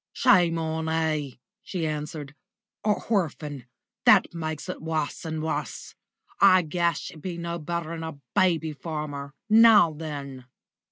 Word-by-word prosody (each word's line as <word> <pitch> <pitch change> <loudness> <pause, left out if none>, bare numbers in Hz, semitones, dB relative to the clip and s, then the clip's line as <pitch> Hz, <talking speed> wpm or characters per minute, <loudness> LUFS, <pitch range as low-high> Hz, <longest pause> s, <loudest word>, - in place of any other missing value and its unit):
"Shame 170 -3 +4
on 160 0 -2
'e!" 155 -5 -1 0.2
she 175 -4 -4
answered. 150 -1 -4 0.5
"A 210 -1 +3
horphan 150 - -2 0.4
that - - +6
makes 155 -2 -4
it - - -5
wus 160 0 -3
and 160 -1 -3
wus. 150 -6 -4 0.5
I 185 -2 +6
guess 170 +1 -1
you 155 - -13
be 175 +2 -5
no 170 0 -4
better 170 +1 -4
'n 165 - -5
a 160 -2 -6 0.2
baby 165 -4 +2
farmer 145 -2 -6
now 220 -6 +7
then!" 140 -4 -7
160 Hz, 135 wpm, -26 LUFS, 150-170 Hz, 0.5 s, now